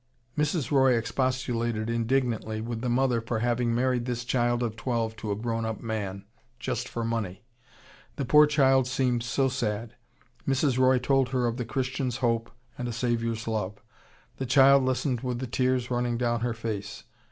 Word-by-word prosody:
"Mrs. 150 -2 0
Roy 130 -3 +5
expostulated 120 -2 -1
indignantly 115 -2 0
with 115 0 -4
the 125 - -1
mother 120 -1 +2
for 115 0 -2
having 120 0 +1
married 125 -1 +1
this 120 -1 -3
child 120 -1 +1
of 110 -2 -2
twelve 115 -2 -2
to 105 -1 -4
a - - 0
grown 115 +1 -2
up 110 -2 -3
man, 100 -4 -4 0.3
just - - -3
for 115 - -3
money. 110 -3 -3 0.7
The 140 - -2
poor 150 +4 +7
child 135 -3 +4
seemed 130 -2 +1
so 135 +3 +1
sad. 115 -4 -2 0.5
Mrs. 135 -1 +2
Roy 130 0 +5
told 130 +1 +2
her 130 -2 0
of 120 0 -1
the 125 - -3
Christian's 130 +1 -2
hope 115 -3 0 0.3
and 125 - -2
a - - -3
Saviour's 115 -1 -1
love. 105 -3 -2 0.6
The 135 - -3
child 135 +1 +6
listened 130 -1 0
with 125 -2 -2
the 130 - -3
tears 125 0 0
running 120 -1 0
down 120 -1 0
her 120 0 -1
face. 110 -3 -5
120 Hz, 175 wpm, -27 LUFS, 115-130 Hz, 0.7 s, poor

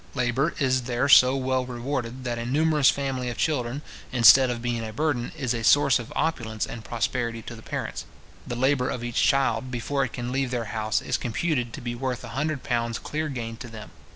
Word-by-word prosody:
Labour 130 +5 0
is 130 -2 +2
there 120 +3 +1
so 130 -2 +7
well 130 -1 0
rewarded, 125 0 -4
that 120 -2 -3
a 115 - -4
numerous 150 +1 +3
family 135 -3 -1
of 120 - -6
children, 140 -2 -1 0.3
instead 125 +2 +7
of 120 -1 -2
being 120 -1 -2
a 110 - -5
burden, 125 -1 -1
is 130 -3 -1
a 115 -1 -3
source 140 +1 +5
of 120 - -8
opulence 110 -9 -1
and 115 - -8
prosperity 115 0 -2
to 120 - -8
the 110 - -12
parents. - - -5 0.4
The 120 - -3
labour 130 +1 +2
of 120 - -4
each 120 -1 -1
child, 135 -2 +2
before 130 +3 -1
it 130 - -4
can 120 0 -4
leave 135 0 0
their 120 -2 -2
house, 110 -1 0
is - - 0
computed 125 0 -1
to - - -7
be 120 -1 -3
worth 125 0 -3
a 120 - -8
hundred 150 +3 -2
pounds 115 -2 -1
clear 155 +1 -3
gain 115 -4 -5
to 120 - -8
them. 110 -2 -10
125 Hz, 210 wpm, -25 LUFS, 120-135 Hz, 0.4 s, so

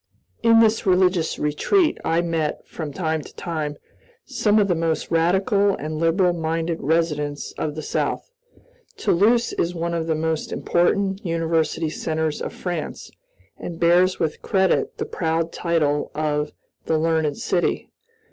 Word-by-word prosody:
In 230 -1 +6
this 220 -1 +2
religious 180 -3 +2
retreat 305 - +1
I 165 +1 +2
met, 165 -3 -2
from 155 -3 -6
time 160 -1 -1
to - - -14
time, 155 -3 -4 0.5
some 210 0 +1
of 205 -2 +4
the 180 - +2
most 165 -2 -1
radical 190 +4 +2
and 155 +1 -5
liberal 175 +2 +3
minded 165 0 -2
residents 150 -2 -1
of 150 -1 -4
the 155 - -5
South. - - -2 0.7
Toulouse 230 +7 +2
is 175 +1 -1
one 170 0 -2
of 165 -1 -2
the 160 - +1
most 160 0 -2
important 195 +3 +1
university 165 -2 0
centers 160 -1 -2
of - - -3
France, 175 -4 -5 0.5
and 170 -1 -6
bears 180 +2 +4
with 160 -2 -2
credit 190 -2 +1
the - - -2
proud 165 0 -1
title 150 -4 0
of 150 -1 -1 0.4
"the 160 - +2
learned 160 -2 +1
city." 175 -2 -1
165 Hz, 145 wpm, -23 LUFS, 155-180 Hz, 0.7 s, In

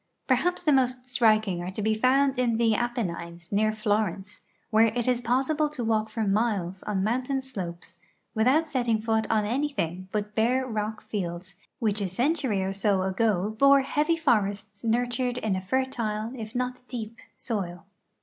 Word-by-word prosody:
Perhaps 355 +8 +1
the 305 -4 +4
most 255 -1 +1
striking 215 -7 +3
are 175 - -4
to 190 +3 -5
be 220 +1 +2
found 265 +4 +2
in 235 -3 +2
the 230 -1 +3
Aj) 240 +2 -1
enines, 170 -5 -5
near 215 +1 +2
Florence, 210 -2 -2 0.3
where 220 +1 +5
it 235 +2 -2
is 250 -1 +2
possible 270 +6 +1
to 290 -5 -5
walk 220 -1 +1
for 220 +1 -2
miles 195 -3 0
on 195 -3 -1
mountain 255 +5 0
slopes 180 -9 -7 0.4
without 260 +9 +3
setting 240 -6 0
foot 220 0 0
on 215 -2 +2
anything 210 - -2
but 210 0 -2
hare 250 +4 +2
rock 215 -2 -3
fields, 180 -2 -4 0.2
which 215 -5 0
a 195 - 0
century 245 - 0
or 190 +1 -2
so 195 -1 +1
ago 195 +1 +1
bore 275 0 +7
heavy 300 +5 +1
forests 210 -8 0
nurtured 245 +2 0
in 215 -5 -1
a 185 - -2
fertile, 225 -1 -1
if 220 -2 -7
not 250 0 -2
deep, 230 -2 -6 0.2
soil. 185 -6 -4
220 Hz, 170 wpm, -27 LUFS, 205-255 Hz, 0.4 s, bore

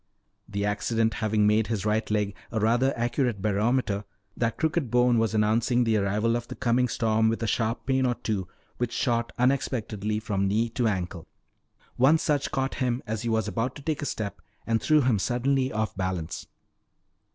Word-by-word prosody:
The 100 0 -2
accident 110 +2 0
having 110 -1 +2
made 105 +1 +3
his 110 -3 -2
right 110 +1 0
leg 105 -2 0 0.2
a 115 - -1
rather 120 +5 +3
accurate 120 -2 0
barometer, 105 +1 0 0.3
that 115 -1 -1
crooked 160 -4 0
bone 125 -1 +3
was 115 -1 0
announcing 115 +3 +2
the 115 -2 +2
arrival 105 +3 +1
of 120 0 -3
the - - -7
coming 125 0 +2
storm 110 -1 +2
with 115 +1 -2
a - - 0
sharp 115 +1 -1
pain 130 -1 +2
or 120 - 0
two 100 -6 -3 0.3
which 120 -1 -1
shot 120 -2 0
unexpectedly 110 -5 0
from 100 -3 -1
knee 110 +4 +1
to 115 +1 0
ankle. 90 -4 -3 0.7
One 135 +6 +5
such 145 -3 0
caught 135 -2 -1
him 125 0 0
as 110 0 -3
he 120 - -2
was 110 -2 +1
about 120 +2 -2
to 145 - -10
take 155 0 -2
a 145 - -2
step 105 -2 -4 0.2
and 115 -1 +1
threw 155 -1 +4
him 125 -6 +2
suddenly 130 +4 +1
off 110 -1 -2
balance. 95 -3 -3
115 Hz, 185 wpm, -27 LUFS, 105-125 Hz, 0.7 s, One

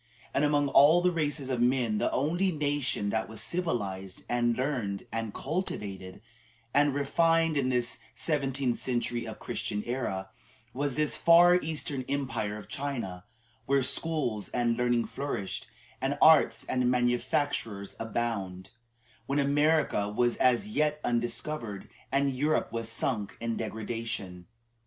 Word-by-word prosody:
And 140 - +2
among 145 -1 +3
all 150 +6 +6
the 180 - +4
races 145 -5 -1
of 125 -2 0
men 120 -4 +2
the - - +1
only 175 +7 +1
nation 145 -9 0
that 110 0 -1
was 110 -1 -8
civilized, 100 - -3
and 120 -1 +1
learned, 125 -8 -2
and 115 -1 -3
cultivated, 100 - -4 0.5
and 145 -1 +3
refined 165 +3 +2
in 135 -3 +1
this 125 -1 -1 0.2
seventh 140 -4 -1 0.2
century 120 -1 -1
of - - -6
the - - -16
Christian 105 0 -2
era, 95 -7 -3 0.4
was 140 0 -2
this 150 -1 0
far 170 +1 +7
eastern 155 -5 -1
Empire 115 -7 -2
of 105 - -10
China, 115 -10 -4 0.4
where 135 0 +3
schools 130 -8 -1
and 120 -1 +1
learning 120 -1 +1
flourished, 135 -9 -4 0.3
and 135 +2 0
arts 155 -8 +6
and 125 -1 +1
manufactures 120 -4 0
abounded, 100 -5 -3 0.6
when 140 - 0
America 145 -6 +2
was 120 +3 +1
as 125 - +3
yet 150 -7 0
undiscovered 120 -2 -2 0.2
and 140 0 +1
Europe 150 +1 +1
was 115 0 -3
sunk 115 -2 -1
in 115 -1 -2
degradation. 110 -5 -4
125 Hz, 135 wpm, -29 LUFS, 110-145 Hz, 0.6 s, far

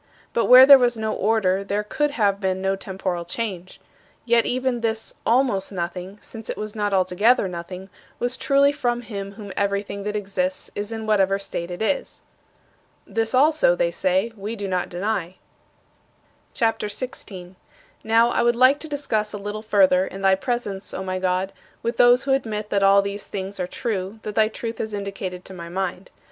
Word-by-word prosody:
But 230 - +2
where 255 +1 +10
there 275 0 +10
was 240 -2 +2
no 220 0 -2
order 200 -3 +1
there 200 +1 -1
could 295 +8 0
have 200 -2 +2
been 190 -1 0
no 195 +1 0
temporal 190 -2 -4
change. 185 -1 -5 0.5
Yet 235 -1 +3
even 255 -1 -1
this 225 -1 -2
'almost 235 -6 +2
nothing,' 180 +1 -5
since 225 -2 -9
it - - -3
was 215 0 -5
not 205 -1 -1
altogether 195 +5 +3
nothing, 180 +1 -7 0.3
was 245 +1 -1
truly 280 +1 +3
from 240 -4 -1
him 200 -3 -6
from 215 +1 -10
whom 200 -2 -8
everything 200 0 -1
that 210 0 -2
exists 275 +8 -2
is 205 +2 -4
in 225 -1 -5
whatever 195 -2 +2
state 175 -3 -5
it 175 +4 -4
is." 275 +6 -2 0.8
"This 225 +2 -1
also," 320 - +4
they - - +1
say, 275 -4 0
"we 210 +2 -5
do 200 -2 -4
not 185 -1 -1
deny." 185 -1 -2 1.2
CHAPTER 225 -2 0
XVI 255 +6 -4
23. 185 -2 -10 0.5
Now, 230 +2 +4
I - - +1
would 240 0 +3
like 255 +4 +5
to 315 - -5
discuss 220 -8 -1
a - - -3
little 205 +1 -5
further, 190 -3 +3
in 195 - -8
thy 195 0 +4
presence, 205 -2 -3
O 190 - -4
my 185 0 -3
God, 185 +1 -1 0.3
with 235 +1 -2
those 245 +1 +6
who 275 - +1
admit 215 -5 -2
that 200 - +2
all 195 0 +5
these 200 +1 -5
things 195 0 -5
are 180 - -1
true 195 -1 -3
that 210 - -4
thy 215 +1 +3
Truth 225 +1 -6
has 220 -1 -3
indicated 195 -2 -5
to 190 - -10
my 170 -2 -8
mind. 185 +1 -4
210 Hz, 190 wpm, -23 LUFS, 190-235 Hz, 1.2 s, where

